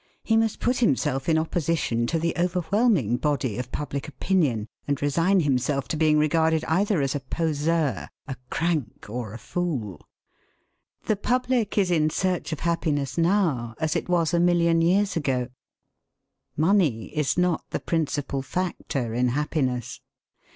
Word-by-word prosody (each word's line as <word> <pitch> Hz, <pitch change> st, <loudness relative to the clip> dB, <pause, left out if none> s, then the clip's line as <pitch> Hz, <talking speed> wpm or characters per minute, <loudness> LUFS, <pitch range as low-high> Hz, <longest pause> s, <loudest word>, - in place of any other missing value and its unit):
He 225 Hz, -, +2 dB
must 225 Hz, -1 st, +1 dB
put 245 Hz, +1 st, +1 dB
himself 140 Hz, -, +1 dB
in 160 Hz, -, +4 dB
opposition 160 Hz, -7 st, 0 dB
to 165 Hz, -, 0 dB
the 165 Hz, +1 st, 0 dB
overwhelming 180 Hz, -, +1 dB
body 135 Hz, -6 st, -1 dB
of 125 Hz, 0 st, -5 dB
public 140 Hz, -1 st, -4 dB
opinion, 145 Hz, -, 0 dB, 0.2 s
and 145 Hz, -1 st, 0 dB
resign 165 Hz, +7 st, +2 dB
himself 135 Hz, -2 st, 0 dB
to -, -, -1 dB
being 155 Hz, -1 st, +3 dB
regarded 160 Hz, +1 st, +2 dB
either 190 Hz, +1 st, +1 dB
as 135 Hz, -, 0 dB
a 145 Hz, -, -1 dB
poseur, 150 Hz, -, -1 dB, 0.2 s
a 135 Hz, -, -4 dB
crank, 160 Hz, -9 st, -2 dB
or 120 Hz, -3 st, -4 dB
a 110 Hz, -, -7 dB
fool. 130 Hz, -, -3 dB, 1.0 s
The 215 Hz, -, +2 dB
public 245 Hz, -1 st, 0 dB
is 190 Hz, -3 st, +3 dB
in 155 Hz, -2 st, +3 dB
search 180 Hz, +1 st, -1 dB
of 155 Hz, -, -4 dB
happiness 155 Hz, -5 st, -1 dB
now, 165 Hz, -, +1 dB
as 160 Hz, +1 st, 0 dB
it 170 Hz, -, -2 dB
was 170 Hz, -2 st, +2 dB
a 170 Hz, -, +3 dB
million 170 Hz, -1 st, +3 dB
years 195 Hz, +4 st, +2 dB
ago. 130 Hz, -6 st, -1 dB, 1.1 s
Money 155 Hz, -, +2 dB
is 150 Hz, 0 st, 0 dB
not 180 Hz, -2 st, +1 dB
the -, -, -2 dB
principal 145 Hz, -4 st, -1 dB
factor 135 Hz, -5 st, -3 dB
in 125 Hz, +2 st, +2 dB
happiness. 130 Hz, -2 st, -1 dB
160 Hz, 150 wpm, -25 LUFS, 135-175 Hz, 1.1 s, in